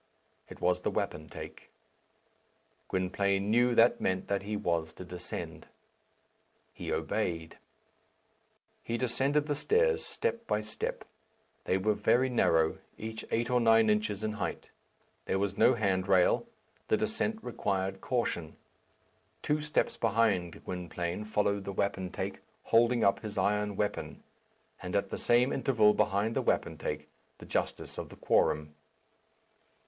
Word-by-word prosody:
It - - -11
was 90 0 +1
the - - 0
wapentake. 80 +1 -5 1.2
Gwynplaine 100 +2 0
knew 120 +1 +4
that 115 +1 +5
meant 95 0 -1
that 100 -1 +1
he 105 +1 -3
was 85 -4 -1
to 90 - -9
descend. 90 0 -7 1.1
He - - -5
obeyed. 80 -2 -2 1.2
He 115 - -2
descended 135 +4 +1
the 150 - 0
stairs 460 - +2
step 235 - -3
by 105 - +1
step. 110 0 -5 0.6
They 95 - +2
were 105 +3 +2
very 120 +5 +2
narrow, 80 -9 +2 0.2
each 110 0 -6
eight 120 +2 0
or 125 - +4
nine 115 -2 +5
inches 105 -1 -1
in 110 - 0
height. 105 -2 -4 0.5
There - - 0
was 100 0 -1
no 130 - +5
hand 95 -4 0
rail. 95 - +4 0.4
The - - +3
descent 220 0 -1
required 95 0 -2
caution. 115 -10 -2 0.9
Two 150 +1 +1
steps 150 0 0
behind 105 -6 +1
Gwynplaine 90 +2 -4
followed 100 -2 0
the 100 - -5
wapentake, 95 -1 -2 0.2
holding 120 0 +3
up 100 - +3
his 110 -1 -7
iron 105 +1 +1
weapon; 105 +1 -3 0.6
and - - -4
at - - 0
the - - -3
same 125 +3 +3
interval 110 -6 +4
behind 105 +3 +1
the - - +2
wapentake, - - -1 0.3
the - - -12
justice - - -3
of - - -6
the - - -12
quorum. 75 0 +1
105 Hz, 135 wpm, -31 LUFS, 95-120 Hz, 1.2 s, that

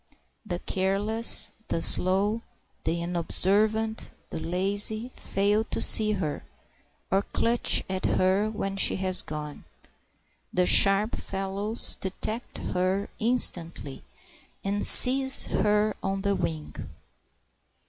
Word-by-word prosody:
The 185 -5 -6
careless, 200 +5 +1 0.2
the - - -3
slow, 195 +6 -1 0.4
the 170 +1 -3
unobservant, 210 +6 0 0.2
the - - -6
lazy 205 +7 0
fail 205 -2 -2
to - - -5
see 215 -1 +5
her, 165 -7 -5 0.7
or 195 +1 +1
clutch 230 +3 0
at 190 0 -5
her 190 +3 0
when 195 -2 -6
she - - +1
has 185 -1 -1
gone. 150 -1 -9 0.9
The 180 0 0
sharp 195 +4 +3
fellows 195 +3 0
detect 215 +5 -6 0.2
her 185 +2 -2
instantly, 175 - 0 0.6
and 200 +1 -3
seize 265 +1 +7
her 210 +1 -1
on 195 0 -4
the 200 -1 0
wing. 80 - -5
195 Hz, 105 wpm, -25 LUFS, 185-215 Hz, 0.9 s, seize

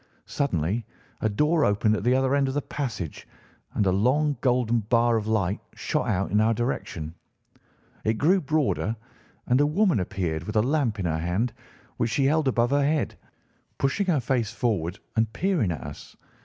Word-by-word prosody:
Suddenly 105 - -1 0.4
a 110 - +2
door 150 +9 +2
opened 105 0 +2
at 105 - -3
the 125 +2 +3
other 130 0 +2
end 140 -1 +3
of 135 - -3
the 145 - +1
passage, 110 - -5 0.5
and 105 - +2
a 95 - +3
long, 135 +10 +2
golden 120 -2 +2
bar 115 +2 +2
of 110 -1 -1
light 100 -3 0 0.2
shot - - -1
out 95 +2 0
in 105 +2 +3
our 115 +1 +3
direction. 90 -9 -3 0.9
It 110 +1 +1
grew 180 - +3
broader, 145 -7 0 0.5
and 125 +3 +3
a 145 - +4
woman 180 - +2
appeared 85 -3 -2
with 105 - -5
a 110 - +4
lamp 130 -5 +1
in 95 - -3
her 80 -1 0
hand, 95 +8 -1 0.4
which 115 - 0
she 135 +5 +1
held 155 +1 +2
above 120 -1 +2
her 145 0 +3
head, 150 +2 +1 0.6
pushing 165 +9 0
her 165 -6 +3
face 120 -3 0
forward 95 -7 -1 0.2
and 110 -1 +2
peering 160 - +1
at 75 - -4
us. - - -10
120 Hz, 180 wpm, -26 LUFS, 105-140 Hz, 0.9 s, a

